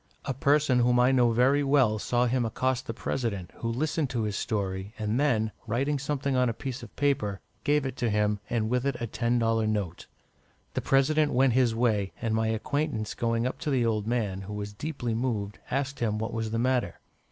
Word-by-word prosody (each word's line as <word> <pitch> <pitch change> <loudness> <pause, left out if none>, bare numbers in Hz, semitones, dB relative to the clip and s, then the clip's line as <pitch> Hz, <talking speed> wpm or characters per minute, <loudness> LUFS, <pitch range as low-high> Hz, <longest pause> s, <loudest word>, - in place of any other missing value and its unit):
A 135 - -1
person 140 0 +3
whom 125 0 +3
I 125 +2 +5
know 125 -2 +4
very 130 +5 +3
well 135 -6 +3
saw 120 +3 +1
him 125 +1 +1
accost 130 +3 -1
the - - -1
President, 110 -8 -3
who 115 - -3
listened 150 +3 -1
to 120 -3 -1
his 105 -1 -2
story, 100 0 -3
and 110 +2 -1
then, 110 -7 +2 0.2
writing 135 +6 0
something 140 -1 -1
on 125 -1 +3
a - - -1
piece 130 0 -5
of 120 -4 -12
paper, 110 -9 0 0.2
gave 145 -1 +2
it 130 -1 -4
to 120 - 0
him, 105 0 +1
and 115 -2 0
with 125 +2 0
it 140 - 0
a 120 - -2
ten 120 +2 0
dollar 115 -1 +2
note. 100 -6 -2 0.7
The - - -1
President 150 +3 +3
went 130 -1 +4
his 120 -2 +3
way, 110 -5 +1
and 115 -1 -1
my 110 0 +1
acquaintance 110 +1 -1
going 115 0 0
up 130 - -3
to 170 - -3
the 130 -4 +2
old 110 -2 0
man, 105 -5 -1
who 100 +2 -7
was 105 0 -5
deeply 125 -1 -3
moved, 110 -4 -2
asked 140 +1 -2
him 110 -3 0
what 110 +1 -3
was 110 -1 -2
the 115 - -2
matter. 125 +1 0
120 Hz, 210 wpm, -28 LUFS, 110-135 Hz, 0.7 s, I